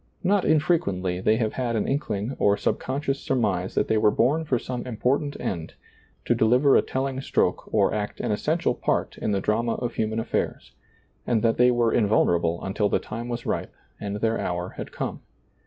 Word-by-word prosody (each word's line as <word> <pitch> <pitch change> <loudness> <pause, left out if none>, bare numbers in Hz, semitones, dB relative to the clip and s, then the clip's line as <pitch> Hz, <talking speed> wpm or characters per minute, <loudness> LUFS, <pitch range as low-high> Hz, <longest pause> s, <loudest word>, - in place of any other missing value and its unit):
Not 195 +1 +2
infrequently 100 - +1
they 110 - +3
have 110 -2 -1
had 120 -3 -1
an 110 - 0
inkling 130 -4 -2
or 100 0 +3
subconscious 135 +1 -1
surmise 100 -8 -1
that - - +1
they 110 - +2
were 105 - +5
bom 145 +9 +2
for 130 -5 +1
some 125 +1 -4
important 135 +5 -1
end, 85 -3 -4 0.5
to - - +3
deliver 125 +5 +4
a - - +6
telling 130 0 -3
stroke - - 0
or - - +3
act 105 -1 -3
an - - -1
es 105 - -1
sential 160 +3 0
part - - 0
in - - -1
the 100 - +1
drama 115 +4 0
of 120 -1 -3
human 110 0 -1
atilairs, 115 +1 -2 0.6
and 115 -2 +1
that 115 -1 +2
they 125 0 +6
were 120 -2 +2
invulnerable 85 -6 +2
until 100 +2 0
the - - +2
time 115 +3 -6
was 120 0 -4
ripe - - -3 0.2
and 100 -1 -4
their 115 0 +1
hour 90 +1 -2
had - - -8
come. - - -4
115 Hz, 190 wpm, -25 LUFS, 105-130 Hz, 0.6 s, a